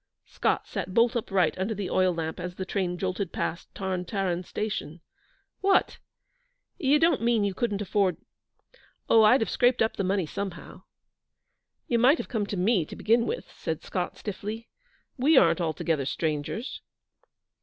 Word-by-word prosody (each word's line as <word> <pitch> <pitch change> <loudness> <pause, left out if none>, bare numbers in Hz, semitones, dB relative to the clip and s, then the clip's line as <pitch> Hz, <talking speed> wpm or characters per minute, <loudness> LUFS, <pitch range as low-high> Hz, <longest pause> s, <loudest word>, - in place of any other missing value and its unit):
Scott - - -1
sat 185 - -5
bolt 235 +1 +4
upright 195 -8 +1
under 205 +4 -1
the 200 -2 -4
oil 185 -1 +3
lamp 160 -2 -4
as 180 0 -5
the 190 - -4
train 185 -2 -2
jolted 185 0 -2
past 170 - -3
Tarn 190 -2 -2
Taran 180 -2 -2
station. 190 -5 -4 0.6
'What! 390 -1 +2 0.8
You 285 -3 +4
don't 325 -2 +3
mean 230 -2 +2
you 200 -1 0
couldn't 210 0 -1
afford 195 -3 +1 0.5
' - - -31
'Oh, 225 - +7
I'd 220 +4 +6
have 220 - 0
scraped 245 0 +3
up 220 - -1
the - - 0
money 190 -1 +1
somehow.' 180 +1 -6 1.1
'You 235 - +2
might 265 +7 +5
have - - -6
come 215 -5 -1
to 205 - -4
me, 190 0 +2
to - - -9
begin 230 +2 +2
with,' - - -5
said - - -4
Scott, - - -3
stiffly; 210 +3 -6 0.5
'we 295 +5 +5
aren't - - +5
altogether 160 -3 -1
strangers.' 155 - -3
200 Hz, 165 wpm, -27 LUFS, 180-230 Hz, 1.1 s, Oh